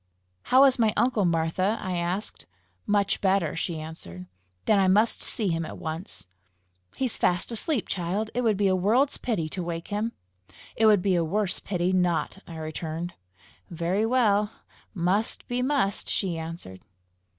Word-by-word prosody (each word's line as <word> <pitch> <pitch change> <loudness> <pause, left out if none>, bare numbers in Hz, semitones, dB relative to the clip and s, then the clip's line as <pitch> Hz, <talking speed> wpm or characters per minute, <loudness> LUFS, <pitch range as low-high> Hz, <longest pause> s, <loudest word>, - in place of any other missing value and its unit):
"How 260 +2 +6
is 265 -2 +4
my 220 -2 +3
uncle, 235 -5 +2
Martha?" 170 +5 +1
I 185 - -3 0.3
said. - - -8 0.4
"Much 205 -1 +1
better," 190 -5 +2
she 165 -1 -3
answered. 90 - -8 0.4
"Then 210 -2 +4
I 190 - +4
must 210 +5 +3
see 210 -4 0
him 165 -1 0
at - - -7
once!" 160 +4 -6 0.7
"He's 260 -3 -2
fast 180 +5 +1
asleep, 235 +2 0
child! 195 +4 -2
It 245 - 0
would 220 -4 +2
be 205 - +1
a 190 - +3
world's 230 +10 +2
pity 195 -10 -1
to 185 - -4
wake 170 -1 -5
him!" 215 +3 -2 0.6
"It 220 - +4
would 205 -4 +5
be 195 - +2
a 170 -2 +2
worse 190 +3 -1
pity 180 -1 -1
not!" 180 0 +1
I 170 - -8
returned. 160 +2 -4 0.6
"Very 175 +6 0
well: 210 -4 +3 0.5
must 190 +5 0
be 245 +1 -1
must!" 255 -7 +1
she 185 -4 -1
answered. 160 - -7
190 Hz, 160 wpm, -26 LUFS, 170-215 Hz, 0.7 s, How